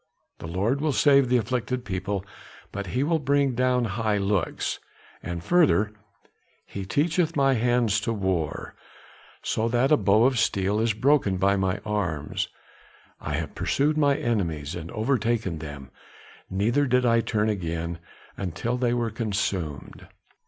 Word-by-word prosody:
The -, -, -7 dB
Lord 100 Hz, +11 st, 0 dB
will 155 Hz, -2 st, +1 dB
save 140 Hz, +3 st, +4 dB
the 125 Hz, -, +4 dB
afflicted 125 Hz, +2 st, -2 dB
people, 95 Hz, 0 st, -3 dB, 0.5 s
but 100 Hz, -1 st, -5 dB
he 125 Hz, +8 st, 0 dB
will 160 Hz, +2 st, +1 dB
bring 140 Hz, -1 st, +2 dB
down 125 Hz, 0 st, +2 dB
high 110 Hz, 0 st, 0 dB
looks,' 100 Hz, -3 st, -1 dB, 0.4 s
and 85 Hz, -1 st, -5 dB
further, 150 Hz, -, +3 dB, 0.7 s
'He 100 Hz, -1 st, -6 dB
teacheth 165 Hz, -, +1 dB
my 135 Hz, -1 st, +3 dB
hands 120 Hz, -3 st, +2 dB
to 115 Hz, -, -1 dB
war, 95 Hz, -8 st, -2 dB, 0.7 s
so 110 Hz, -, 0 dB
that 120 Hz, +4 st, +2 dB
a 150 Hz, -, +6 dB
bow 105 Hz, -1 st, +4 dB
of 130 Hz, -3 st, +2 dB
steel 100 Hz, -1 st, +1 dB
is 115 Hz, 0 st, +2 dB
broken 115 Hz, -4 st, +2 dB
by 100 Hz, +2 st, +3 dB
my 95 Hz, -1 st, 0 dB
arms; 90 Hz, -9 st, -2 dB, 0.7 s
I -, -, -3 dB
have -, -, -4 dB
pursued 150 Hz, +2 st, +1 dB
mine 145 Hz, -2 st, +3 dB
enemies, 85 Hz, -10 st, -1 dB
and 85 Hz, -1 st, -6 dB
overtaken 110 Hz, -, 0 dB
them, 70 Hz, -3 st, -8 dB, 0.6 s
neither 115 Hz, +9 st, +1 dB
did 125 Hz, 0 st, +2 dB
I 115 Hz, -1 st, +4 dB
turn 110 Hz, -2 st, 0 dB
again 85 Hz, -4 st, -3 dB, 0.6 s
till 120 Hz, +2 st, -1 dB
they 120 Hz, -1 st, +1 dB
were 120 Hz, -2 st, -1 dB
consumed. 100 Hz, -, -3 dB
110 Hz, 145 wpm, -25 LUFS, 95-125 Hz, 0.7 s, a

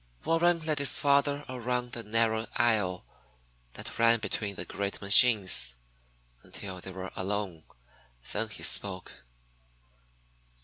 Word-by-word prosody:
Warren 170 Hz, +1 st, +2 dB
led 155 Hz, -2 st, -1 dB
his 140 Hz, -3 st, +4 dB
father 140 Hz, 0 st, +1 dB
around 125 Hz, -1 st, -4 dB
the 120 Hz, -, -5 dB
narrow 110 Hz, 0 st, -1 dB
aisle 105 Hz, -6 st, 0 dB, 0.7 s
that -, -, -8 dB
ran 115 Hz, 0 st, +4 dB
between 105 Hz, -2 st, -4 dB
the -, -, -5 dB
great 100 Hz, 0 st, -5 dB
machines, 100 Hz, -, +5 dB, 0.7 s
until 95 Hz, -2 st, -9 dB
they 95 Hz, -, -8 dB
were 95 Hz, 0 st, -8 dB
alone. 95 Hz, -4 st, -4 dB, 0.7 s
Then 110 Hz, +1 st, -3 dB
he 110 Hz, -, -10 dB
spoke. 95 Hz, -2 st, 0 dB
110 Hz, 120 wpm, -28 LUFS, 100-125 Hz, 0.7 s, machines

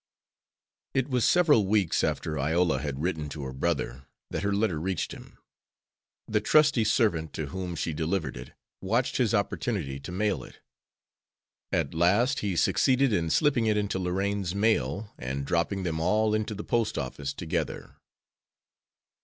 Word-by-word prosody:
It 135 Hz, +1 st, +1 dB
was 125 Hz, -2 st, +2 dB
several 150 Hz, -, +4 dB
weeks 100 Hz, -5 st, +2 dB
after 75 Hz, -2 st, -1 dB
Iola 80 Hz, 0 st, +2 dB
had 70 Hz, 0 st, -4 dB
written 80 Hz, -4 st, -2 dB
to 75 Hz, -1 st, -6 dB
her 65 Hz, -1 st, -5 dB
brother 65 Hz, -3 st, -2 dB, 0.2 s
that -, -, -2 dB
her 100 Hz, -, 0 dB
letter 100 Hz, -5 st, +1 dB
reached 90 Hz, +1 st, -2 dB
him. -, -, -12 dB, 0.9 s
The 105 Hz, -1 st, +1 dB
trusty 150 Hz, 0 st, +4 dB
servant 85 Hz, -8 st, +1 dB
to 75 Hz, -3 st, -4 dB
whom 90 Hz, 0 st, -4 dB
she 80 Hz, +1 st, -2 dB
delivered 80 Hz, +2 st, -2 dB
it 60 Hz, +1 st, -9 dB, 0.3 s
watched 115 Hz, +6 st, 0 dB
his 115 Hz, -4 st, +2 dB
opportunity 100 Hz, -, -2 dB
to 70 Hz, -, -8 dB
mail 95 Hz, -6 st, 0 dB
it. -, -, -14 dB, 1.1 s
At 70 Hz, -, 0 dB
last 100 Hz, -, +3 dB
he 100 Hz, -4 st, -2 dB
succeeded 130 Hz, +7 st, +3 dB
in 80 Hz, -4 st, +1 dB
slipping 125 Hz, -, +2 dB
it 105 Hz, -1 st, +2 dB
into 100 Hz, -2 st, -1 dB
Lorraine's 95 Hz, +1 st, -1 dB
mail 105 Hz, 0 st, 0 dB
and 65 Hz, +2 st, -3 dB
dropping 85 Hz, +5 st, 0 dB
them 80 Hz, -3 st, -2 dB
all 105 Hz, +6 st, +2 dB
into 110 Hz, 0 st, -1 dB
the 105 Hz, -, -6 dB
post 115 Hz, -2 st, 0 dB
office 70 Hz, +2 st, -3 dB
together. 80 Hz, +3 st, -4 dB
95 Hz, 155 wpm, -28 LUFS, 80-110 Hz, 1.1 s, several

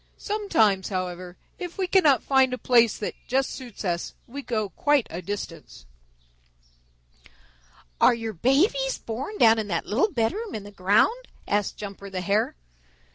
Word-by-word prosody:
Sometimes, 270 Hz, -, +1 dB
however, 180 Hz, -2 st, -4 dB, 0.2 s
if 355 Hz, 0 st, -6 dB
we 385 Hz, -, 0 dB
cannot 315 Hz, -, +4 dB
find 265 Hz, -2 st, +3 dB
a -, -, -11 dB
place 235 Hz, -3 st, +3 dB
that 210 Hz, -, -4 dB
just 265 Hz, +2 st, +1 dB
suits 245 Hz, -5 st, -8 dB
us, 175 Hz, -1 st, -2 dB
we 280 Hz, +4 st, -7 dB
go 220 Hz, -6 st, -2 dB
quite 290 Hz, +3 st, +2 dB
a 175 Hz, -, -5 dB
distance." 165 Hz, -, -7 dB, 2.2 s
"Are -, -, +6 dB
your 225 Hz, -1 st, -5 dB
babies 270 Hz, -, +2 dB
born 265 Hz, -, -6 dB
down 225 Hz, -, +6 dB
in 215 Hz, -, -3 dB
that 170 Hz, -4 st, -2 dB
little 270 Hz, -, +1 dB
bedroom 375 Hz, -, -2 dB
in 210 Hz, -, -5 dB
the 205 Hz, -, -11 dB
ground?" 210 Hz, -, +2 dB, 0.2 s
asked 205 Hz, -1 st, 0 dB
Jumper 200 Hz, -1 st, -8 dB
the 185 Hz, -1 st, -4 dB
Hare. 200 Hz, -, 0 dB
225 Hz, 150 wpm, -25 LUFS, 200-275 Hz, 2.2 s, Are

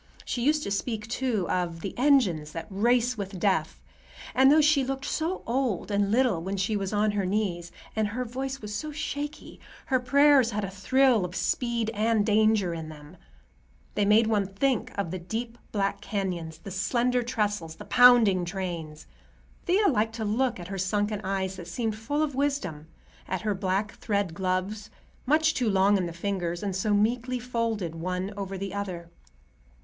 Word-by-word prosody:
She 245 Hz, -, -2 dB
used 300 Hz, +4 st, +2 dB
to -, -, -4 dB
speak, 210 Hz, +1 st, -2 dB
too, 225 Hz, -5 st, -1 dB
of 170 Hz, -2 st, -2 dB
"the 195 Hz, -, -5 dB
engines 225 Hz, -, +2 dB
that 165 Hz, -1 st, -5 dB
race 240 Hz, +3 st, +2 dB
with 195 Hz, -1 st, -5 dB
death"; 170 Hz, -5 st, 0 dB, 0.5 s
and 265 Hz, +1 st, +6 dB
though 310 Hz, -, +6 dB
she 300 Hz, -2 st, +4 dB
looked 270 Hz, +1 st, -3 dB
so 330 Hz, +4 st, -2 dB
old 235 Hz, -5 st, -1 dB
and 200 Hz, 0 st, +1 dB
little 235 Hz, -7 st, +2 dB
when 190 Hz, +3 st, -3 dB
she 195 Hz, +3 st, 0 dB
was 195 Hz, -2 st, -2 dB
on 210 Hz, 0 st, +2 dB
her 205 Hz, -1 st, -1 dB
knees, 180 Hz, -3 st, -1 dB, 0.2 s
and 220 Hz, -1 st, +1 dB
her 245 Hz, +5 st, -3 dB
voice 265 Hz, +3 st, -4 dB
was 210 Hz, 0 st, -5 dB
so 305 Hz, +9 st, -4 dB
shaky, 295 Hz, 0 st, -5 dB, 0.3 s
her 260 Hz, -2 st, +2 dB
prayers 280 Hz, 0 st, +5 dB
had 210 Hz, -2 st, -2 dB
a 195 Hz, -, -4 dB
thrill 240 Hz, +3 st, +3 dB
of 180 Hz, 0 st, -5 dB
speed 235 Hz, -2 st, 0 dB
and 220 Hz, -1 st, +1 dB
danger 215 Hz, -4 st, +3 dB
in 160 Hz, -1 st, -6 dB
them; 150 Hz, +2 st, -12 dB, 0.8 s
they 205 Hz, -, +1 dB
made 210 Hz, +3 st, +5 dB
one 210 Hz, -3 st, +1 dB
think 240 Hz, +5 st, 0 dB
of 200 Hz, -5 st, -2 dB
the 185 Hz, -, -4 dB
deep 230 Hz, +6 st, -5 dB, 0.2 s
black 200 Hz, -2 st, -1 dB
canyons, 175 Hz, -6 st, -3 dB
the 195 Hz, -, -10 dB
slender 245 Hz, +6 st, +1 dB
trestles, 205 Hz, -8 st, -2 dB
the -, -, -10 dB
pounding 235 Hz, -7 st, +6 dB
trains. 170 Hz, -4 st, -5 dB, 0.6 s
Thea 395 Hz, +4 st, +4 dB
liked 225 Hz, -, +1 dB
to 220 Hz, -2 st, -3 dB
look 230 Hz, +1 st, 0 dB
at 175 Hz, 0 st, -8 dB
her 195 Hz, -1 st, -4 dB
sunken 205 Hz, +2 st, 0 dB
eyes 190 Hz, -1 st, -2 dB
that 175 Hz, -2 st, -8 dB
seemed 220 Hz, +4 st, -2 dB
full 290 Hz, +8 st, -1 dB
of 295 Hz, -2 st, -2 dB
wisdom, 260 Hz, -, -2 dB, 0.4 s
at 185 Hz, -, -2 dB
her 215 Hz, -1 st, 0 dB
black 195 Hz, +2 st, -1 dB
thread 200 Hz, -5 st, -1 dB
gloves, 190 Hz, +4 st, -2 dB, 0.4 s
much 315 Hz, +3 st, +3 dB
too 245 Hz, -4 st, 0 dB
long 195 Hz, +1 st, +4 dB
in 185 Hz, -3 st, 0 dB
the -, -, -5 dB
fingers 175 Hz, 0 st, -3 dB
and 195 Hz, -2 st, -2 dB
so 200 Hz, +3 st, 0 dB
meekly 235 Hz, +5 st, +1 dB
folded 230 Hz, -7 st, -2 dB
one 180 Hz, +4 st, -3 dB
over 195 Hz, -1 st, -5 dB
the 195 Hz, 0 st, -5 dB
other. 180 Hz, -4 st, -5 dB
205 Hz, 180 wpm, -27 LUFS, 185-245 Hz, 0.8 s, and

